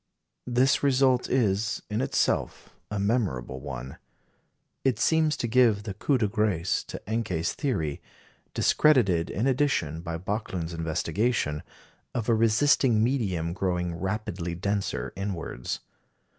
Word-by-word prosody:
This 125 +2 +3
result 130 -2 +3
is, 110 -4 +1
in 110 +2 -1
itself, - - -1 0.2
a 105 - -3
memorable 100 - -1
one. 65 -1 -7 0.8
It 130 -5 +2
seems 155 +4 +2
to 120 - -1
give 115 -3 +4
the 100 -2 -5
coup 130 +8 +1
de 110 -4 +1
grâce 100 -4 0
to - - -6
Encke's 100 -7 -1
theory 90 - -2 0.5
discredited, 105 - +3
in 110 - -1
addition, 130 - +1
by 85 -1 -4
Backlund's 95 -2 -3
investigation 80 +1 -1 0.5
of 115 -3 -2
a 120 - +4
resisting 115 +1 +3
medium 95 -10 0
growing 90 -2 -1
rapidly 90 -1 -3
denser 100 -8 -2
inwards. 95 -10 -4
105 Hz, 120 wpm, -27 LUFS, 85-120 Hz, 0.8 s, give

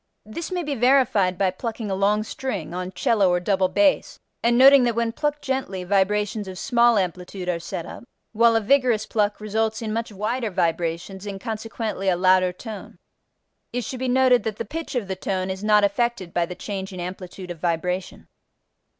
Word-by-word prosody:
This 315 - -6
may 360 -1 -1
be 295 -2 -2
verified 245 -7 +3
by 190 -1 +2
plucking 220 +1 -5
a - - 0
long 205 +2 +2
string 210 -8 -5
(on 180 +1 -4
cello 205 -4 +2
or 180 0 +2
double 190 +1 +1
bass) 290 +10 +2 0.2
and 235 0 +3
noting 270 +1 +8
that 240 -2 +1
when 230 -1 0
plucked 295 +4 -2
gently 265 -9 -2
vibrations 205 +2 0
of 185 -1 -7
small 240 0 +3
amplitude 180 0 -3
are 175 -2 0
set 170 0 -5
up, - - -10 0.3
while 230 +1 +4
a 225 - +3
vigorous 240 -2 +2
pluck 210 -2 0
results 220 +1 -1
in 220 -2 -3
much 230 0 -3
wider 220 +4 -2
vibrations, 170 +2 -2
and, 195 -1 -5
consequently, 220 -2 -4
in 185 - +4
a - - -5
louder 185 0 +4
tone. 210 +2 -9 0.7
It 245 0 -2
should 255 +3 -6
be 260 - -2
noted 255 -1 +4
that 220 -2 -3
the 230 - -5
pitch 325 -2 -6
of 235 -6 -1
the 190 - -3
tone 185 0 -2
is 190 +2 -6
not 210 -1 +4
affected 200 -2 0
by 175 -1 +1
the 180 - -7
change 195 -1 -5
in 185 - -8
amplitude 180 0 -7
of 170 - -8
vibration. 180 +2 -2
210 Hz, 195 wpm, -23 LUFS, 185-235 Hz, 0.7 s, noting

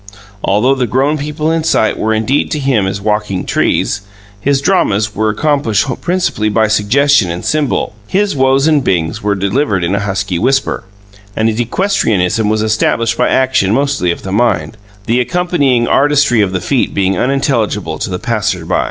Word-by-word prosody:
Although 110 +7 +2
the 130 -2 -1
grown 140 +6 0
people 150 +2 -2
in 165 -1 0
sight 110 -8 +1
were 110 - -1
indeed 110 +6 0
to 150 - -2
him 130 -8 +1
as 95 +1 -3
walking 105 -2 -2
trees, 100 - 0 0.4
his 140 +5 +1
dramas 110 - +1
were 110 +1 0
accomplished 140 -1 0 0.2
principally 175 -12 -1
by 110 +1 +2
suggestion 110 +1 +2
and 85 +1 -5
symbol. 150 -7 -1
His 200 +1 0
"Whoas" 135 +2 +2
and 150 -3 +2
"Bings" 85 -4 -1
were 105 0 0
delivered 100 0 0
in 85 +3 0
a 100 - +1
husky 95 -3 -2
whisper, 135 -2 0 0.5
and 110 - +1
his 110 +1 -3
equestrianism 115 - 0
was 110 0 0
established 110 +1 0
by - - +1
action 130 -6 +2
mostly 140 -9 0
of 85 - -3
the 95 - -5
mind, 100 -6 0 0.3
the 120 +2 +1
accompanying 140 -6 +1
artistry 145 -5 +3
of 100 -2 0
the 95 -1 -2
feet 135 -3 -1
being 95 -1 +1
unintelligible 115 - -1
to - - -3
the 90 - -3
passerby. 100 -6 -2
115 Hz, 170 wpm, -14 LUFS, 100-140 Hz, 0.5 s, artistry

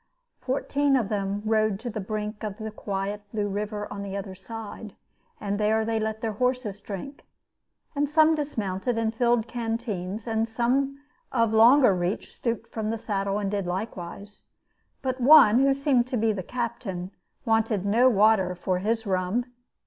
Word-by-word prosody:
Fourteen 280 +1 +1
of 230 -6 +1
them 200 0 -2
rode 215 -2 +2
to 240 -1 -4
the 215 - -4
brink 210 +1 -4
of 210 -2 -4
the 220 -1 -5
quiet 200 0 -4
blue 210 -2 -1
river 210 +1 -3
on 200 - -6
the 200 0 -4
other 195 -1 -6
side; 215 +1 -8 0.4
and 205 0 -2
there 220 +1 +2
they 225 0 0
let 220 0 -3
their 225 - -1
horses 250 -2 -1
drink, 210 +9 -7 0.7
and 285 0 0
some 315 +1 +5
dismounted 230 -7 -2
and 225 -1 0
filled 240 -1 +2
canteens, 225 -4 -4
and 225 -1 -1
some 265 +4 0 0.3
of 230 -3 +2
longer 235 +1 +7
reach 180 +2 -2
stooped 230 -1 -3
from 220 -1 -3
the 225 - -1
saddle 200 -2 -2
and 200 -2 -2
did 200 -3 -2
likewise. 195 +1 -6 0.6
But 260 -1 -2
one, 255 -4 +8
who 275 +1 +4
seemed 270 -3 +2
to 255 - -2
be 220 0 +2
the 195 - -4
captain, 195 -5 -4 0.3
wanted 225 -3 +1
no 235 +6 +5
water 205 -4 +3
for 180 +1 -1
his 225 +3 -1
rum. 190 +5 0
220 Hz, 165 wpm, -26 LUFS, 200-240 Hz, 0.7 s, one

